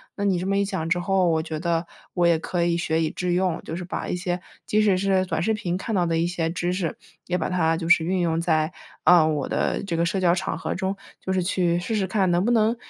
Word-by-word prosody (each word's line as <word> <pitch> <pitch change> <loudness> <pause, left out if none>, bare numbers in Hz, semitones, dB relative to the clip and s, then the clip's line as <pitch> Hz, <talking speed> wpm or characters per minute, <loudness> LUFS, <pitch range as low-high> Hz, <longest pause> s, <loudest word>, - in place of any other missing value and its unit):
那 200 - -2
你 190 -3 +2
这 180 - -3
么 195 0 +1
一 200 - +2
讲 190 -5 -3
之 175 +1 +2
后， 185 0 +2
我 160 -1 +2
觉 160 -1 -5
得 170 0 -1 0.3
我 175 -1 +3
也 170 -1 +4
可 170 +1 -1
以 170 0 +1
学 165 -1 0
以 160 - +1
致 180 0 -2
用， 180 -2 0
就 160 - -5
是 180 - -5
把 180 - -4
一 - - -1
些 180 0 -2 0.2
即 215 - +2
使 200 -3 +3
是 190 0 +2
短 160 - -1
视 220 +6 +1
频 180 -5 -2
看 220 +3 -3
到 180 -2 +2
的 165 -1 0
一 165 +1 +1
些 170 -2 -1
知 175 +1 -1
识， 180 -4 -2 0.3
也 180 - 0
把 165 - -1
它 165 -3 +1
就 165 -1 -4
是 170 - +6
运 185 +3 0
用 165 -1 +1
在， 160 -1 +1 0.3
呃， 175 -3 +7
我 150 -3 -1
的 - - -1
这 185 -4 -3
个 170 - +2
社 190 +3 -1
交 175 -2 +4
场 - - -2
合 - - -3
中， 190 +1 -2 0.2
就 190 - -3
是 185 - +1
去 175 -1 +1
试 220 +6 -2
试 200 -3 +1
看 190 -1 +1
能 175 +1 +2
不 240 - +2
能 225 0 +3
175 Hz, 300 characters per minute, -24 LUFS, 170-190 Hz, 0.3 s, 呃